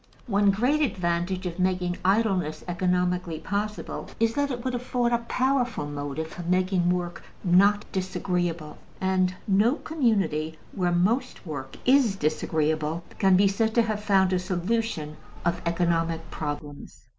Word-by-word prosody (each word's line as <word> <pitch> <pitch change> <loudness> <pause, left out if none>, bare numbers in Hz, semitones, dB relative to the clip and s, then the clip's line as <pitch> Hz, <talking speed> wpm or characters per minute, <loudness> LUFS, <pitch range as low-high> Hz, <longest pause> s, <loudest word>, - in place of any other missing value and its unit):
One 205 -3 +3
great 250 +10 +2
advantage 180 - -1
of 175 0 -4
making 180 -1 0
idleness 190 -5 +1
economically 180 -1 0
possible 205 +6 -4
is 230 0 +2
that 285 +2 0
it 245 -2 -4
would 255 - -1
afford 245 -1 0
a 235 - +3
powerful 250 - 0
motive 145 +1 -4
for 160 +2 -8
making 180 0 +1
work 175 -1 -2 0.2
not 200 +3 +4
disagreeable; 175 -4 -2 0.2
and 185 -1 +1
no 210 +6 +4
community 200 - 0
where 180 -2 0
most 220 +10 0
work 135 -5 -6
is 255 -6 +4
disagreeable 155 0 0 0.2
can 190 -1 +5
be 200 +1 +5
said 220 +3 0
to 235 - +5
have 215 -2 -2
found 190 -2 +3
a 185 - +2
solution 180 -3 -2 0.3
of 170 0 0
economic 165 -1 0
problems. 145 -1 -6
185 Hz, 140 wpm, -26 LUFS, 170-215 Hz, 0.3 s, can